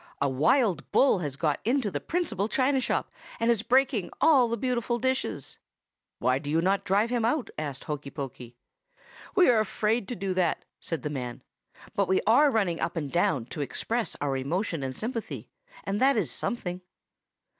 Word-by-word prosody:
'A 140 - +2
wild 175 - +2
bull 265 -8 +4
has 145 -5 -3
got 150 -1 0
into 240 -3 +1
the - - -2
principal 320 - -1
china 265 +3 +2
shop, - - -1 0.3
and 230 +1 +3
is 225 -3 +1
breaking 250 -5 +2
all 275 -7 +5
the 235 0 -2
beautiful 240 0 -1
dishes.' 260 +2 -2 0.6
"'Why 130 +1 +1
do 145 - -7
you 160 +2 +2
not 195 +3 +1
drive 205 +5 +2
him 240 -2 +1
out?' 245 +4 0
asked 145 -4 -4
Hokey 150 -2 -5
Pokey. 125 -4 -8 0.8
"'We 370 -3 +6
are 230 - +4
afraid 215 0 0
to 245 - -4
do 195 -2 -2
that,' 180 -3 0
said 165 - -4
the 150 - -2
man; 125 -4 -5 0.5
'but 200 -2 +2
we 190 +1 +3
are 270 +7 +6
running 195 -9 0
up 170 - -1
and 145 -5 -3
down 140 -8 +1
to 150 - -4
express 225 - -2
our 140 -2 -1
emotion 165 +5 -2
and 130 -1 -4
sympathy, 230 0 -5 0.3
and 205 +3 -2
that 270 -1 +4
is 195 -8 +1
something. 180 -6 -3
200 Hz, 180 wpm, -28 LUFS, 150-240 Hz, 0.8 s, We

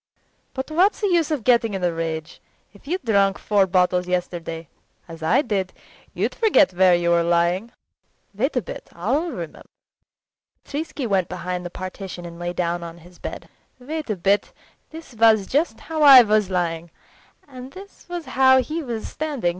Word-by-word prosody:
But 265 +3 -5
what's 370 +6 +3
the 410 - +1
use 335 -3 +2
of 300 -7 -2
getting 235 -4 +3
in 190 - -4
a 175 -1 +1
rage. 160 -1 -5 0.3
If 205 +6 -19
you'd 350 -2 -3
drunk 200 -3 +2
four 200 -2 +2
bottles 180 -1 +1
yesterday 170 -2 -3 0.4
as 165 -1 -11
I 160 - +2
did 195 -6 -2 0.4
you'd - - -1
forget 395 - +3
where 180 0 +5
you 170 0 +1
were 170 0 +4
lying. 175 +6 +1 0.6
Wait 260 +9 -1
a 250 - 0
bit, - - -9
I'll 265 - -1
remember!" - - -8 1.0
Petritsky 290 -2 -4
went 195 -5 0
behind 180 0 -4
the 175 - -5
partition 185 0 -7
and 170 0 -10
lay 175 0 -3
down 175 -1 -2
on 170 0 -8
his 175 +1 -17
bed. - - -7 0.3
"Wait 300 +3 -6
a 215 - 0
bit! 195 +3 0 0.4
This 320 -4 -11
was 220 -3 +4 0.4
how 320 -1 -4
I 275 -4 +10
was 210 -2 +1
lying, 170 -2 -2 0.6
and 260 -1 -10
this 390 -1 -14
was 350 -2 -5
how 260 0 +4
he 310 +6 -3
was 235 -6 -5
standing. 290 - -2
200 Hz, 170 wpm, -22 LUFS, 175-270 Hz, 1.0 s, I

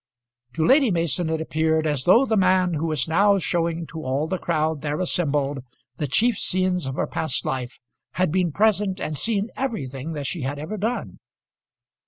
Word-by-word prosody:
To 160 0 0
Lady 270 -1 +5
Mason 170 -2 0
it 160 0 -1
appeared 160 0 0
as 145 -4 0
though 230 +9 +6
the 225 - 0
man 185 -2 +3
who 160 +1 -1
was 150 -5 0
now 200 +5 +4
showing 170 -1 -1
to 160 0 -8
all 135 +2 -1
the 180 +3 -3
crowd 155 -2 -1
there 150 0 -2
assembled 145 -6 0 0.4
the 150 - -2
chief 225 - +2
scenes 185 -4 0
of 130 - -4
her - - 0
past 160 -5 -2
life, 125 -1 -3 0.4
had 185 -3 +1
been 180 -1 +1
present 205 +1 +2
and 155 - -3
seen 205 - 0
everything 155 - -4
that 145 -2 -5
she 170 +3 -3
had 135 +2 -3
ever 155 +9 -5
done. 225 +5 -3
165 Hz, 185 wpm, -23 LUFS, 150-185 Hz, 0.4 s, though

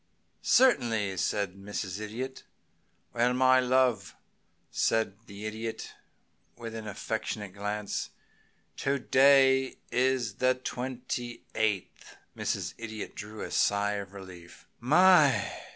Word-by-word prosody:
"Certainly," 115 - +3
said 100 +1 -1
Mrs. 100 -1 -5
Idiot. 120 +5 -5 0.7
"Well, 120 +1 +2
my 130 0 +5
love," 125 -5 +1 0.6
said 110 -3 +1
the 100 +1 -9
Idiot, 110 +1 -5 0.6
with 115 -1 -7
an 110 -1 -6
affectionate 105 -1 -4
glance, 105 +1 -3 0.7
"to 140 +1 0
day 135 0 +4
is 125 -5 +1
the 130 - +3
ah - - +5
the 130 - -16
twenty 125 -1 -5
eighth." 105 -4 -2 0.2
Mrs. - - -2
Idiot 110 -2 -6
drew 105 +1 -8
a - - -5
sigh 100 0 +2
of 100 0 -11
relief. 90 -3 -12
"My!" 155 +2 +5
115 Hz, 115 wpm, -29 LUFS, 105-130 Hz, 0.7 s, my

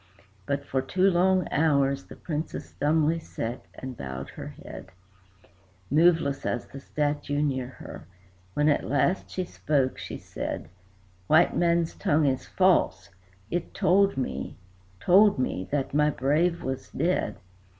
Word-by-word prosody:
But 140 0 -1
for 135 -1 0
two 185 +8 +2
long 185 +1 +3
hours 140 - +2
the - - -11
Princess 155 -1 -5
dumbly 155 +2 +2
sate 120 -6 -5 0.2
and 130 -1 -7
bowed 65 - -6
her - - -8 0.2
head, - - -9 1.0
Moveless 160 -2 +3
as 120 - -2
the 140 - -10
statue 145 0 -2
near 130 -4 -1
her. 130 - -11 0.5
When 150 0 +2
at 145 - +3
last 145 +7 +1
she 185 - -2
spake, 140 -6 0
she - - -6
said: - - -5 0.6
"White 165 +3 +5
man's 170 -1 +2
tongue 150 0 +1
is 130 -2 0
false. 135 - +2 0.4
It 175 -1 -3
told 195 +1 +3
me 70 - -3 0.4
told 200 - +5
me 95 -7 -2
that 140 -2 -1
my 150 +1 +4
brave 155 +5 +1
was 130 0 -4
dead. 175 +3 0
150 Hz, 140 wpm, -27 LUFS, 130-170 Hz, 1.0 s, White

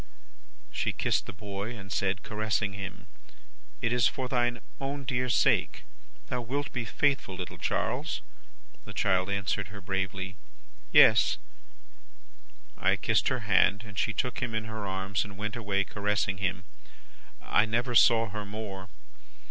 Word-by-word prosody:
"She - - -1
kissed - - 0
the - - -5
boy, 100 +3 -6
and 95 -1 -10
said, 100 +1 0
caressing 105 -1 -1
him, 100 0 -7 0.8
'It 115 +1 +2
is 125 -2 +5
for 130 -1 -3
thine 120 -2 +1 0.2
own 140 +1 -3
dear 125 -1 0
sake. 115 - +2 0.4
Thou 125 -1 -2
wilt 140 +5 -3
be 120 -2 -2
faithful, 135 -5 +1
little 90 0 -6
Charles?' - - -1 0.6
The - - -9
child 95 0 +2
answered 100 0 -1
her 100 +1 -9
bravely, 95 0 -3 0.5
'Yes!' - - +7 1.4
I - - +2
kissed - - +2
her - - 0
hand, 100 +3 +3
and 100 -2 -10
she 110 - +1
took 125 +3 -2
him 120 -3 -2
in 110 0 -1
her 110 -2 -5
arms, 95 0 -1
and 100 -2 -10
went 105 +3 -3
away 100 -4 0
caressing 100 -1 -1
him. 90 -1 -1 0.8
I 105 - +3
never 120 +3 0
saw 115 -1 +6
her 105 +1 -4
more. 100 -2 -6
105 Hz, 150 wpm, -29 LUFS, 95-115 Hz, 1.4 s, Yes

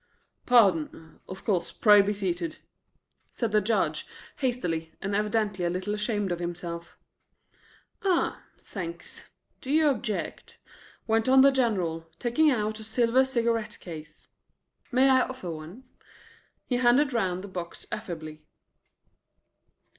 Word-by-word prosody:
"Pardon. 165 -9 +3
Of 185 - -9
course; 185 -5 0
pray 210 -2 +6
be 200 +1 0
seated," 180 -5 -3 0.7
said 230 -3 -2
the 210 0 +4
Judge, 215 +2 0 0.3
hastily, 175 - -2
and 200 +1 -3
evidently 210 -2 0
a 175 - +1
little 185 +4 -2
ashamed 210 -2 -1
of 175 - -2
himself. 170 -1 -6 1.0
"Ah! 370 -3 +1 0.2
thanks. 170 -4 -7 0.3
Do 260 - -9
you 305 +1 +4
object?" 220 -6 -4 0.5
went 225 +2 +2
on 265 0 +7
the 275 +1 +7
General, 185 -11 0
taking 275 +6 +3
out 215 -4 0
a - - -8
silver 235 +3 +3
cigarette 235 -4 -1
case. 155 -3 -10 0.6
"May 260 +2 +4
I 260 -1 +5
offer 255 -10 -4
one?" 165 +10 -9 0.8
He 250 - 0
handed 255 +3 +4
round 185 -5 0
the - - -7
box 175 -3 -7
affably. 155 -7 -6
210 Hz, 125 wpm, -27 LUFS, 175-240 Hz, 1.0 s, on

